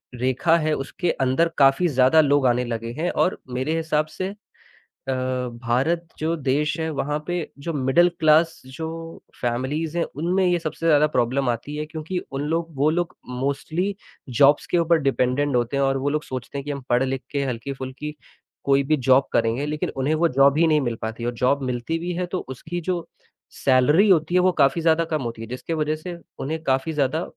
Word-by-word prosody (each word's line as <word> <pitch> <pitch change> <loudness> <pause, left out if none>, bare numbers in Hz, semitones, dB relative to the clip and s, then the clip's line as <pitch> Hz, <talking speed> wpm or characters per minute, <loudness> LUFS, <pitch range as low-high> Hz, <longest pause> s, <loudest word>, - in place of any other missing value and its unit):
रेखा 130 +7 +2
है 155 -1 0
उसके 165 +5 -2
अंदर 135 +6 +1
काफ़ी 135 +5 +5
ज़्यादा 135 +1 +5
लोग 145 -2 +2
आने 125 +1 +2
लगे 115 -1 -4
हैं। 170 +3 0
और 185 - 0
मेरे 130 +5 -1
हिसाब 155 -2 0
से 185 0 -2 0.8
अ, - - +2
भारत 130 +5 -1
जो 160 +2 0
देश 145 0 0
है 160 0 -1
वहाँ 145 0 -1
पे 175 - -1 0.3
जो 165 - -3
मिडल 145 +5 +3
क्लास 160 +1 +4
जो 135 +5 -6 0.5
फैमिलीज़ 135 +7 -2
हैं 170 - +2
उनमें 180 +5 +1
ये 175 -1 +3
सबसे 165 0 -5
ज़्यादा 150 -1 +5
प्रॉब्लम 130 -1 0
आती 120 +5 -3
है 150 - -3
क्योंकि 155 +3 -5
उन 135 0 -3
लोग 165 -1 -2
वो 145 +3 +3
लोग 175 +2 0
प्रॉब्लम 125 0 -9
मोस्टली 160 +8 -2 0.4
जॉब्स 145 +1 +5
के - - +3
ऊपर 170 0 +3
डिपेंडेंट 135 +1 +1
होते 120 +3 0
हैं। 140 - +2
और 135 0 +2
वो 135 +2 -1
लोग 150 +1 -1
सोचते 130 +2 -6
हैं 140 - -4
कि 145 - -3
हम 140 -1 -5
पढ़-लिख 130 +2 +1
के 140 -2 0
हल्की-फुल्की 135 +3 -5 0.5
कोई 140 0 +4
भी 155 +3 +1
जॉब 130 +1 +5
करेंगे 115 +4 +1
लेकिन 150 0 -2
उन्हें 135 +4 +1
वो 170 +2 +3
जॉब 140 +1 +4
ही 165 +1 +4
नहीं 155 -1 +3
मिल 120 -3 -1
पाती। 110 +1 -4
और 120 - -1
जॉब 125 +4 +1
मिलती 125 +6 -2
भी 175 +2 -3
है 180 +1 -2
तो - - 0 0.2
उसकी 175 +7 -5
जो 175 -2 -2 0.6
सैलरी 145 +10 +5
होती 170 -1 +3
है 180 - +5
वो 185 - +4
काफ़ी 145 0 +2
ज़्यादा 165 0 +3
कम 155 -2 -2
होती 115 -1 -5
है 115 - -6
जिसके 125 +7 -5
वजह 155 -1 0
से 175 +3 -7 0.2
उन्हें 160 +4 -3
काफ़ी 135 +3 0
ज़्यादा 150 +3 0
145 Hz, 200 wpm, -23 LUFS, 130-160 Hz, 0.8 s, काफ़ी